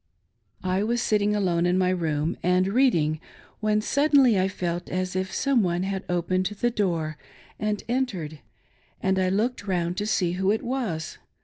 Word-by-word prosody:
I 185 +1 0
was 235 +3 0
sitting 210 -2 +1
alone 175 -4 +1
in 180 +1 +2
my, 185 -1 +2
room, 160 -2 -1
and 180 +1 +3
reading, 175 - +2 0.4
when 215 0 +1
suddenly 275 -4 +4
I 185 - +2
felt 175 -2 -3
as 185 0 -2
if 190 0 -2
some 275 -3 +2
one 175 -1 0
had 190 0 -3
opened 180 +1 0
the 210 +4 -1
door 165 -8 -1 0.4
and 210 -1 -1
entered, 200 - -2 0.6
and 190 0 +1
I 185 -1 +2
looked 210 +2 -1
round 175 -1 -1
to 210 +1 -1
see 180 -5 +1
who 190 +2 0
it 215 +2 +1
was. 230 -11 -3
190 Hz, 170 wpm, -25 LUFS, 175-215 Hz, 0.6 s, suddenly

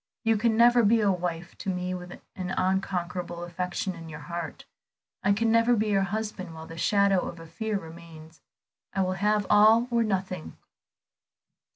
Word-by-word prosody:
You 225 -1 +3
can 220 +1 +1
never 240 +1 +6
be 225 +1 +4
a 205 -2 +3
wife 175 -1 -4
to - - -4
me 180 0 -2
with 180 -1 -8 0.2
an 185 -1 -4
unconquerable 180 -2 -1
affection 180 +3 -3
in 165 -1 -10
your 150 0 -8
heart; 170 +2 -6 0.6
I 200 - +2
can 225 +3 +2
never 230 +1 +4
be 215 -1 0
your 195 -1 +3
husband 195 -3 -4
while 160 0 -8
the 165 - -10
shadow 200 +1 +3
of 170 - -8
a 165 - -10
fear 215 +6 -3
remains. 165 -2 -12 0.5
I 195 - +2
will 185 0 0
have 210 +2 +1
all 220 +3 +6
or 235 -1 +3
nothing." 190 - -2
190 Hz, 175 wpm, -27 LUFS, 170-215 Hz, 0.6 s, never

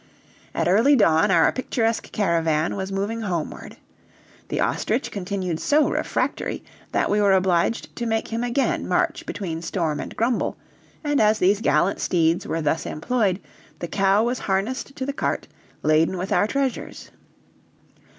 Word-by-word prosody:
At - - 0
early 225 +11 +5
dawn 165 -5 +4
our 170 -3 +4
picturesque 230 -3 -1
caravan 165 -5 +1
was 190 0 -4
moving 205 +4 -2
homeward. 175 -7 -4 0.7
The - - -3
ostrich - - 0
continued 185 -4 -3
so 300 +1 +3
refractory - - -2 0.3
that - - +1
we 210 0 +3
were 200 -1 +4
obliged 185 +3 +1
to 235 - -2
make 225 0 -1
him 230 +1 -2
again 245 +3 0
march - - 0
between 165 -5 -4
Storm 165 -3 -2
and - - -6
Grumble, 235 +1 0 0.5
and 290 -3 +1
as 215 0 +4
these 200 +3 +2
gallant 195 -4 +2
steeds 165 -1 +1
were 165 -1 -2
thus 155 +2 0
employed, 195 +3 0 0.4
the 175 - -5
cow 195 +4 +2
was 245 +2 -1
harnessed 215 +8 -2
to 260 - -4
the 280 - -3
cart, - - -2 0.4
laden 155 +4 +3
with 185 +2 -4
our 205 - +3
treasures. 270 +1 -3
195 Hz, 150 wpm, -23 LUFS, 170-230 Hz, 0.7 s, early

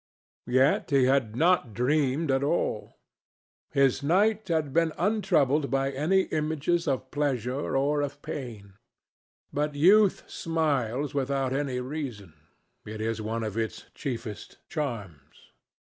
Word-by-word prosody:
Yet 130 +3 +3
he 140 -2 +4
had 130 -5 +1
not 160 - +2
dreamed 140 +3 +1
at 135 0 +2
all. 140 - -1 0.7
His 135 -1 +2
night 205 +8 +2
had 160 -5 0
been 165 -1 +2
untroubled 170 -8 +2
by 135 0 0
any 155 +8 +2
images 160 +2 0
of 130 -2 -2
pleasure 135 -2 -1
or 145 +2 +1
of 145 0 -4
pain. 105 -8 -7 0.7
But 150 0 -1
youth 195 +7 +5
smiles 145 -5 -1
without 135 -1 -1
any 135 -2 -1
reason. 125 - -6 0.5
It 110 0 -7
is 110 0 -2
one 115 +1 -3
of 105 -2 -4
its 110 -1 -4
chiefest 115 -6 -6
charms. 105 - -6
140 Hz, 125 wpm, -27 LUFS, 125-155 Hz, 0.7 s, youth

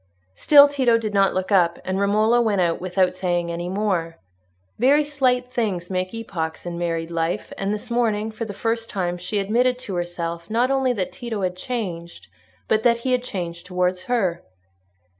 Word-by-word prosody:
Still 285 - +7
Tito 260 -5 +2
did 215 -2 -4
not 195 -1 +3
look 185 +2 -2
up, 175 -4 +3
and 185 +1 -1
Romola 215 +4 +3
went 215 -4 +1
out 170 -2 +1
without 185 0 +1
saying 175 -2 -1
any 175 +1 -4
more. 185 -4 -1 0.6
Very 280 +5 +5
slight 255 -4 0
things 190 -7 -2
make 185 0 -1
epochs 180 -10 -5
in 170 0 -4
married 165 -1 -2
life, 165 0 -2
and 195 +1 -2
this 210 +3 -5
morning 220 -2 0
for 220 +1 -5
the 215 - -6
first 225 +2 -2
time 180 -3 -2
she 180 +4 -3
admitted 240 +5 +2
to 215 -6 -7
herself 170 -1 -4
not 240 +4 +1
only 265 -1 +2
that 195 -7 -2
Tito 230 -6 -5
had 180 -1 -1
changed, 180 -6 -5 0.4
but 215 - +2
that 235 0 +3
he 260 - +1
had 250 -1 +2
changed 175 -6 -5
towards 180 0 -1
her. 195 -9 0
200 Hz, 180 wpm, -23 LUFS, 175-235 Hz, 0.6 s, Still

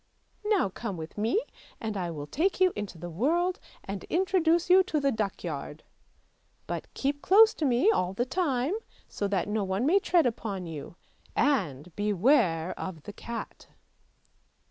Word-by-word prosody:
Now 420 - +2
come 200 -1 -5
with 160 0 -8
me 230 - +1 0.4
and 220 -2 -4
I 180 -3 -2
will 150 -3 -5
take 335 - 0
you 370 -1 +4
into 205 -4 -5
the 175 +2 -7
world, 335 - +1 0.2
and 195 0 -5
introduce 345 -2 +2
you 365 +1 +7
to 310 -5 0
the 280 -1 +2
duckyard; 175 - -4 0.8
but - - -5
keep 285 +1 -1
close 435 +3 +6
to 310 - -2
me 265 - +4
all 180 - 0
the 240 +5 0
time, 275 -1 0 0.3
so 205 - -3
that 195 -1 0
no 210 0 0
one 190 +5 -1
may 365 +7 +5
tread 350 -5 +3
upon 210 -6 -2
you, 160 -1 -7 0.4
and 180 - 0
beware 200 - +2
of 165 -5 -6
the 205 - -8
cat! 235 +2 -7
225 Hz, 160 wpm, -28 LUFS, -, 0.8 s, you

